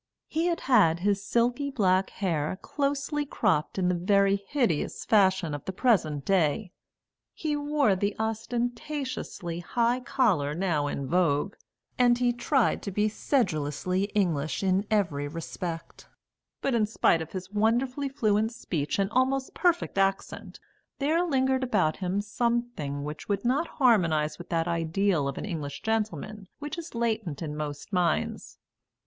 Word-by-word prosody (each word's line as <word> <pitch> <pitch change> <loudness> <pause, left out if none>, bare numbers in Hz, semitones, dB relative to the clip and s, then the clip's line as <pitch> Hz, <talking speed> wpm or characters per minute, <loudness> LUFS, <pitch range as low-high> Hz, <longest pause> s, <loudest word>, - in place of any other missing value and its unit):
He 325 +2 0
had 340 -1 -1
had 170 -10 +4
his 200 0 +1
silky 245 +6 +1
black 190 -7 +2
hair 170 -3 -2
closely 285 +1 -1
cropped 195 - 0
in 185 -2 +1
the 180 - +2
very 195 +3 +3
hideous 240 - 0
fashion 190 -6 +3
of 145 - -5
the - - -2
present 165 - +1
day; 185 +1 +1 0.6
he 305 -2 -1
wore 290 -7 +2
the 200 +2 -1
ostentatiously 235 - -3
high 235 +7 +1
collar 185 - +1
now 165 -5 0
in 140 -1 -3
vogue; 170 +3 +1 0.5
and 245 -1 +5
he 245 -1 +2
tried 250 +1 +1
to - - -4
be 210 +3 +1
sedulously 185 - 0
English 155 -6 0
in 190 +2 +1
every 165 -10 0
respect. 165 +2 -6 0.6
But 275 - +1
in 220 -3 +2
spite 170 -6 +2
of 160 - -7
his 185 0 -6
wonderfully 245 +6 +1
fluent 220 -4 +1
speech 150 -10 -2
and 195 -1 +2
almost 260 +2 +1
perfect 345 - +1
accent, 195 0 -1 0.4
there 315 +5 +2
lingered 265 -5 +1
about 195 -11 +1
him 190 +1 -1
something 235 -10 -2
which 150 +5 -7
would 200 +2 -1
not 280 +7 +2
harmonise 165 - +3
with 175 - -10
that 165 -1 0
ideal 170 -1 +1
of 140 - -4
an - - -4
English 150 -8 -5
gentleman 215 -2 -2
which 295 +3 -5
is 330 -6 -9
latent 220 -10 -1
in 150 -2 -4
most 150 +5 -6
minds. 180 -2 0
200 Hz, 145 wpm, -27 LUFS, 170-245 Hz, 0.6 s, and